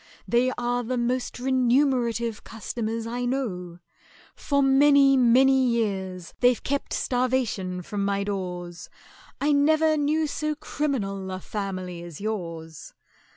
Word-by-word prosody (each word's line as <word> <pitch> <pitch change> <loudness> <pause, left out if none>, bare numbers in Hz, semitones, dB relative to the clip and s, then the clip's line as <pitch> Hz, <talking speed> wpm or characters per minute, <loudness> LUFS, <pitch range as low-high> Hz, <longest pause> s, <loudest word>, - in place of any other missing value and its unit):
They 245 +2 +2
are 245 0 0
the 250 +2 -2
most 245 +1 -1
remunerative 250 -3 +1
customers 225 0 -4
I 240 +2 -3
know; 190 -10 -3 0.6
For 280 -1 0
many 275 0 +5
many 260 +2 +5
years 190 -6 -2
they've 245 -1 +3
kept 280 0 -2
starvation 245 -8 -1
from 200 +2 -3
my 200 0 0
doors: 180 -3 -5 0.5
I 295 +2 +2
never 310 +2 +3
knew 305 +2 +1
so 305 +1 -2
criminal 215 -11 -3
a 185 0 -4
family 185 -3 -5
as 170 -3 -9
yours! 165 -7 -6
235 Hz, 120 wpm, -25 LUFS, 195-270 Hz, 0.6 s, many